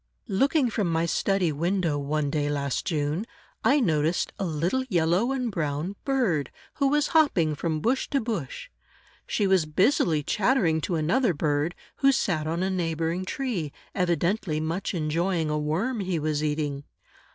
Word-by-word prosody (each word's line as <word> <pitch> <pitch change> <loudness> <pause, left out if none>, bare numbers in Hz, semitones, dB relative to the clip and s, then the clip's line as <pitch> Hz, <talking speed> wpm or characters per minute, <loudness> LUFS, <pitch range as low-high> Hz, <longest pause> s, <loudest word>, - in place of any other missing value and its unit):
Looking 265 +5 +2
from 200 -6 0
my 165 +1 +1
study 185 0 +1
window, 170 +1 0
one 145 0 -1
day, 145 -1 0
last 140 -2 -2
June, 150 +3 -1 0.4
I 290 - +4
noticed 160 - +1
a 195 - -1
little 175 - 0
yellow 180 +6 +2
and 255 -4 -1
brown 155 +2 -2
bird, 230 - +1 0.3
who 280 - +3
was 295 +1 +2
hopping 275 - +3
from 155 +1 -2
bush 255 - +1
to 275 - +1
bush. 220 - -4 0.6
She 205 - 0
was 190 -5 +3
busily 160 - +2
chattering 190 - +2
to 170 - -1
another 175 - +2
bird, 150 +3 0 0.2
who 275 0 +5
sat 160 - 0
on 170 +3 -1
a 190 - 0
neighboring 165 0 -1
tree, 195 - -3 0.2
evidently 175 -1 0
much 165 +5 -2
enjoying 165 +1 0
a 150 - 0
worm 185 +12 -1
he 185 -3 -1
was 155 -1 -1
eating. 150 -2 -2
170 Hz, 155 wpm, -26 LUFS, 155-205 Hz, 0.6 s, who